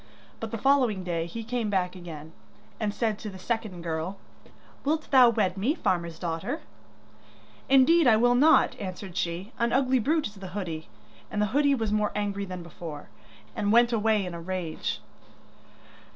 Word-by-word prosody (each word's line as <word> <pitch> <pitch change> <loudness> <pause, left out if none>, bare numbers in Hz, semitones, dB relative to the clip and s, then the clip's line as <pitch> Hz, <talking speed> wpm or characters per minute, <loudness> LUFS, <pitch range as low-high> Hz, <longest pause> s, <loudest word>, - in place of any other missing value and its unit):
But 225 - -4
the 230 - -4
following 250 -6 +2
day 170 -2 -2
he 225 +7 -6
came 235 -1 -2
back 185 -2 0
again, 160 -4 -9 0.5
and 215 -2 0
said 220 -1 -1
to 215 - -6
the 190 - -9
second 205 -3 -3
girl: 165 +3 -3 0.7
'Wilt 310 +2 -1
thou 255 -3 +8
wed 190 -5 0
me, 245 +11 +1
farmer's 170 - -1
daughter?' 170 - -3 1.1
'Indeed 275 +4 +6
I 220 -2 +6
will 245 +2 +4
not,' 300 +6 +5
answered 185 -1 -6
she, 180 +4 -3
'an 235 0 +1
ugly 260 0 +3
brute 305 +6 +1
is 210 - -5
the 190 0 -7
hoodie.' 165 - -5 0.4
And 210 - -3
the 210 - +3
hoodie 285 0 +4
was 225 -4 -2
more 210 0 +1
angry 200 -1 -2
than 185 -2 -7
before, 160 -3 -9 0.5
and 205 - 0
went 235 +1 +5
away 215 -2 +2
in 180 - -5
a 170 - -6
rage. 175 -2 -3
205 Hz, 170 wpm, -27 LUFS, 180-240 Hz, 1.1 s, thou